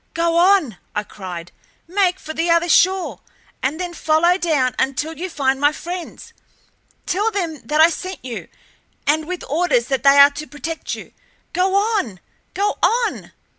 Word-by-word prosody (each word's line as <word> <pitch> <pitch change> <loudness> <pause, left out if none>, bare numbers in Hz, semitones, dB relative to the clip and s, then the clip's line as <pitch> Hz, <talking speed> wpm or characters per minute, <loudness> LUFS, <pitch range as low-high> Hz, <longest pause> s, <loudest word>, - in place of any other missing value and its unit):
"Go 335 0 +1
on!" 345 - +3 0.2
I 210 - 0
cried. 180 -4 -8 0.4
"Make 375 0 +1
for 315 - -7
the 330 +2 -1
other 335 +1 +3
shore, 375 +2 +3 0.4
and 285 +5 -1
then 355 -1 -4
follow 335 +2 +3
down 300 -9 +1
until 295 +4 -1
you 370 +3 -5
find 270 -4 0
my 290 0 +5
friends. 350 +3 -7 0.7
Tell 415 +5 +1
them 345 -8 -3
that 300 +1 +3
I 330 +2 +7
sent 370 -2 -6
you, 240 -3 -6 0.6
and 310 +1 +1
with 365 0 -5
orders 280 -5 +1
that 270 -3 0
they 275 +1 +6
are 280 +1 +9
to 300 +2 -7
protect 305 +4 -5
you. - - -11 0.4
Go 375 +1 +1
on! 400 - 0 0.4
Go 410 +1 0
on!" 470 0 0
325 Hz, 165 wpm, -20 LUFS, 280-365 Hz, 0.7 s, are